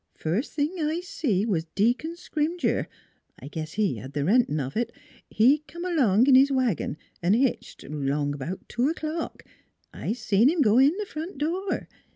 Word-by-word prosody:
" 75 Hz, -, -50 dB
First 190 Hz, -, -1 dB
thing 305 Hz, +5 st, -1 dB
I 315 Hz, +2 st, 0 dB
see 225 Hz, -, -1 dB
was 175 Hz, -8 st, 0 dB
Deacon 245 Hz, +11 st, +1 dB
Scrimger 335 Hz, 0 st, -1 dB, 0.5 s
I -, -, -9 dB
guess 155 Hz, +1 st, -6 dB
he 205 Hz, -, 0 dB
had 130 Hz, +7 st, -9 dB
th' 145 Hz, -, 0 dB
rentin' 205 Hz, -6 st, +3 dB
of 135 Hz, -1 st, -4 dB
it 235 Hz, 0 st, -1 dB, 0.4 s
he 255 Hz, +8 st, +4 dB
come 345 Hz, +1 st, -7 dB
along 250 Hz, -, +3 dB
in 275 Hz, -, +5 dB
his 270 Hz, +2 st, +6 dB
wagon 245 Hz, -, 0 dB, 0.2 s
an' 180 Hz, +5 st, +3 dB
hitched, 255 Hz, +1 st, -1 dB
'long 145 Hz, 0 st, -1 dB
about 145 Hz, +7 st, -6 dB
two 245 Hz, +4 st, 0 dB
o'clock. 320 Hz, 0 st, -4 dB, 0.5 s
I -, -, -3 dB
seen 230 Hz, 0 st, +3 dB
him 330 Hz, 0 st, +1 dB
go 225 Hz, -2 st, +5 dB
in 285 Hz, +7 st, +4 dB
th' 420 Hz, -, -3 dB
front 320 Hz, +1 st, -6 dB
door. 355 Hz, +7 st, -2 dB
245 Hz, 180 wpm, -26 LUFS, -, 0.5 s, his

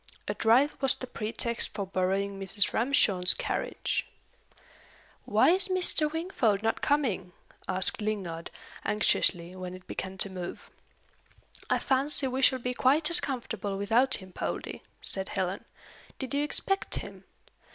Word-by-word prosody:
A -, -, -1 dB
drive 250 Hz, +6 st, +3 dB
was 270 Hz, -2 st, +2 dB
the -, -, -8 dB
pretext 235 Hz, 0 st, -2 dB
for 200 Hz, -2 st, -3 dB
borrowing 195 Hz, +1 st, -2 dB
Mrs. 195 Hz, +1 st, +2 dB
Ramshorn's 215 Hz, -8 st, +6 dB
carriage. -, -, -3 dB, 1.2 s
"Why -, -, +3 dB
is 380 Hz, +2 st, +3 dB
Mr. 360 Hz, -5 st, +2 dB
Wingfold 275 Hz, -, -1 dB
not 225 Hz, -, -1 dB
coming?" 225 Hz, -11 st, -1 dB, 0.3 s
asked 185 Hz, +3 st, +2 dB
Lingard, 190 Hz, -6 st, -4 dB, 0.3 s
anxiously, 180 Hz, -4 st, +1 dB
when 185 Hz, -1 st, -7 dB
it 185 Hz, -, -14 dB
began 190 Hz, 0 st, -6 dB
to 195 Hz, -, -1 dB
move. 180 Hz, -2 st, -8 dB, 1.0 s
"I -, -, +2 dB
fancy 275 Hz, +1 st, 0 dB
we 260 Hz, +1 st, -3 dB
shall 260 Hz, 0 st, +5 dB
be 250 Hz, 0 st, -4 dB
quite 290 Hz, +6 st, +2 dB
as 340 Hz, -, +8 dB
comfortable 225 Hz, -7 st, -4 dB
without 230 Hz, +7 st, +3 dB
him, 190 Hz, -1 st, -9 dB
Poldie," -, -, -5 dB, 0.2 s
said 190 Hz, -1 st, -1 dB
Helen. 190 Hz, 0 st, -3 dB, 0.5 s
"Did 265 Hz, 0 st, -6 dB
you 285 Hz, +1 st, 0 dB
expect 390 Hz, +6 st, -1 dB
him?" -, -, -8 dB
220 Hz, 140 wpm, -28 LUFS, 190-270 Hz, 1.2 s, as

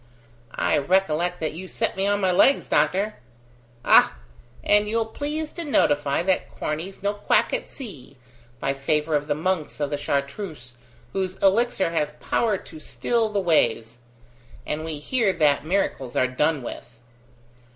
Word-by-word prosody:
"I -, -, +2 dB
recollect 180 Hz, +2 st, +1 dB
that 155 Hz, -, -2 dB
you 185 Hz, +4 st, -7 dB
set -, -, -2 dB
me 195 Hz, +1 st, 0 dB
on 205 Hz, 0 st, +2 dB
my 190 Hz, -1 st, +2 dB
legs, 270 Hz, +10 st, +4 dB
doctor." 190 Hz, +8 st, +1 dB, 0.7 s
"Ah! -, -, +6 dB, 0.5 s
and 210 Hz, 0 st, +3 dB
you'll 225 Hz, +1 st, +1 dB
please 300 Hz, +6 st, -4 dB
to 340 Hz, -, -6 dB
notify 145 Hz, -, +2 dB
that 190 Hz, 0 st, 0 dB
Corney's 170 Hz, +6 st, -4 dB
no 200 Hz, +1 st, +1 dB
quack 205 Hz, -, +1 dB
at -, -, -2 dB
sea, 140 Hz, -, -10 dB, 0.4 s
by 135 Hz, -, 0 dB
favour 150 Hz, +3 st, -1 dB
of 145 Hz, 0 st, -1 dB
the 145 Hz, -, 0 dB
monks 165 Hz, -1 st, -2 dB
of 145 Hz, -1 st, -1 dB
the 145 Hz, -, -2 dB
Chartreuse, 140 Hz, -2 st, -3 dB, 0.4 s
whose 190 Hz, -1 st, -2 dB
elixir 195 Hz, -2 st, +2 dB
has 150 Hz, -3 st, -1 dB
power 210 Hz, +7 st, 0 dB
to 160 Hz, -3 st, -12 dB
still 220 Hz, -, -1 dB
the 205 Hz, -1 st, -1 dB
waves. 120 Hz, -, +1 dB, 0.6 s
And 150 Hz, +1 st, -3 dB
we 160 Hz, -2 st, -4 dB
hear 215 Hz, -, +1 dB
that 150 Hz, -2 st, +2 dB
miracles 160 Hz, -9 st, -1 dB
are -, -, +3 dB
done 145 Hz, +2 st, 0 dB
with!" 120 Hz, -1 st, -9 dB
165 Hz, 155 wpm, -24 LUFS, 145-200 Hz, 0.7 s, Ah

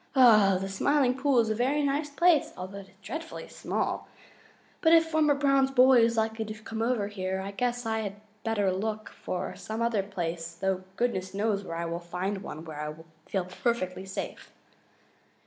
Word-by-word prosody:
The 205 Hz, -7 st, +6 dB
Smiling 255 Hz, +6 st, +2 dB
Pool 265 Hz, -2 st, +3 dB
is 220 Hz, -1 st, -1 dB
a -, -, +3 dB
very 265 Hz, +6 st, +1 dB
nice 285 Hz, +2 st, 0 dB
place, 330 Hz, +1 st, +3 dB
although 185 Hz, +2 st, -6 dB
it 195 Hz, -, -11 dB
is 190 Hz, -, -24 dB
dreadfully 320 Hz, +10 st, -6 dB
small, -, -, -2 dB, 0.7 s
but 325 Hz, -1 st, +5 dB
if 330 Hz, 0 st, +7 dB
Farmer 305 Hz, -2 st, +4 dB
Brown's 275 Hz, -1 st, +3 dB
boy 260 Hz, -1 st, +6 dB
is 230 Hz, 0 st, +2 dB
likely 220 Hz, 0 st, 0 dB
to 215 Hz, 0 st, -6 dB
come 225 Hz, 0 st, -4 dB
over 230 Hz, -3 st, +1 dB
here, 190 Hz, -2 st, -3 dB
I 195 Hz, +1 st, -4 dB
guess 245 Hz, +3 st, -1 dB
I 220 Hz, -3 st, -2 dB, 0.3 s
better 205 Hz, -4 st, +1 dB
look 215 Hz, +3 st, -3 dB
for 180 Hz, -, -5 dB
some 220 Hz, +1 st, -5 dB
other 230 Hz, -3 st, +1 dB
place, 170 Hz, -4 st, -4 dB
though 190 Hz, +1 st, -1 dB
goodness 195 Hz, -6 st, -1 dB
knows 205 Hz, -1 st, 0 dB
where 165 Hz, -3 st, -5 dB
I 170 Hz, -, -2 dB
will 170 Hz, 0 st, -3 dB
find 180 Hz, +3 st, -3 dB
one 160 Hz, -4 st, -7 dB
where 155 Hz, -2 st, -6 dB
I 150 Hz, -, -3 dB
will 160 Hz, +2 st, -10 dB, 0.2 s
feel 190 Hz, -3 st, -1 dB
perfectly 185 Hz, -1 st, -2 dB
safe." 190 Hz, -, -6 dB
215 Hz, 180 wpm, -28 LUFS, 190-250 Hz, 0.7 s, if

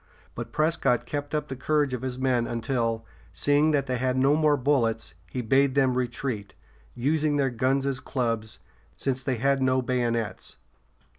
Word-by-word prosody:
But -, -, -6 dB
Prescott 155 Hz, -6 st, +1 dB
kept 145 Hz, +3 st, -4 dB
up 150 Hz, -1 st, -1 dB
the 130 Hz, -, -5 dB
courage 145 Hz, 0 st, +1 dB
of 125 Hz, -, -3 dB
his 130 Hz, -1 st, -3 dB
men 125 Hz, -3 st, +1 dB
until, 115 Hz, -1 st, -1 dB, 0.3 s
seeing 145 Hz, +2 st, +3 dB
that 145 Hz, -3 st, +2 dB
they 130 Hz, -2 st, -1 dB
had 130 Hz, +1 st, 0 dB
no 135 Hz, +3 st, +4 dB
more 150 Hz, -2 st, +3 dB
bullets, 120 Hz, -, 0 dB, 0.2 s
he 125 Hz, -, -3 dB
bade 135 Hz, +3 st, +3 dB
them 135 Hz, -2 st, +3 dB
retreat, 120 Hz, -5 st, -3 dB, 0.4 s
using 150 Hz, +4 st, +1 dB
their 135 Hz, -2 st, +1 dB
guns 130 Hz, +3 st, +1 dB
as 135 Hz, -2 st, -1 dB
clubs, 115 Hz, -5 st, -2 dB, 0.4 s
since 130 Hz, -1 st, -1 dB
they 130 Hz, -1 st, -1 dB
had 135 Hz, +3 st, +1 dB
no 130 Hz, 0 st, +3 dB
bayonets. 120 Hz, -3 st, -2 dB
130 Hz, 165 wpm, -26 LUFS, 120-140 Hz, 0.4 s, no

